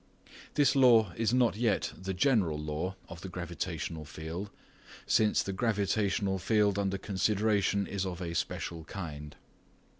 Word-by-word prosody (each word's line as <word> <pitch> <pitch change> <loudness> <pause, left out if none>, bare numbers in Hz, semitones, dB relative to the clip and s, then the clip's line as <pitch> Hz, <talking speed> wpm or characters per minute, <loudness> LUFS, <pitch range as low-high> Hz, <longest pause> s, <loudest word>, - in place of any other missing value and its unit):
This 145 -3 +4
law 115 -8 +6
is 115 -1 +1
not 125 -4 +3
yet 110 -3 0
the 95 0 -5
general 100 - +2
law 75 +5 -3
of 85 0 -10
the 95 - -6
gravitational 85 -2 -4
field, 80 +6 -6 0.6
since 110 -1 +3
the 95 - -4
gravitational 100 -2 0
field 100 +1 +2
under 100 -1 0
consideration 100 0 +1
is 100 -1 -3
of 90 -2 -4
a 85 -2 -4
special 85 0 -3
kind. 75 -5 -7
95 Hz, 140 wpm, -31 LUFS, 85-105 Hz, 0.6 s, law